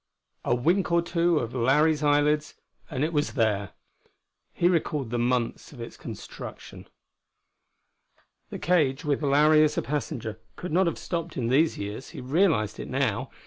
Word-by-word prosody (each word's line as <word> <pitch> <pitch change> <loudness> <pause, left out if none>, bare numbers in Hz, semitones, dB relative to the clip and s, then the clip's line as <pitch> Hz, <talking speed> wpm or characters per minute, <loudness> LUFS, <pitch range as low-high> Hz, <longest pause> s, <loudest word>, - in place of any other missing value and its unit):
A 120 - +2
wink 170 +10 +1
or 170 0 +3
two 170 -1 +1
of 120 -4 -2
Larry's 145 +5 +3
eyelids 150 +1 +2 0.3
and 135 -2 -2
it 160 +2 -1
was 150 -1 0
there. 105 -6 0 0.8
He 175 - +1
recalled 150 -8 0
the 120 - -1
months 120 -1 -1
of 130 - -13
its 115 - -7
construction. - - -9 1.6
The - - -6
cage, 150 -6 +1
with 145 -1 0
Larry 150 +2 +5
as 150 -1 +1
a - - +1
passenger, 130 -6 -4 0.2
could 180 - -6
not 180 +3 +3
have 170 - -1
stopped 170 -2 -4
in 120 -3 -1
these 155 +5 +3
years: 105 +5 -6
he - - -4
realized 135 - +1
it, - - -6
now. - - -1
145 Hz, 160 wpm, -26 LUFS, 125-165 Hz, 1.6 s, Larry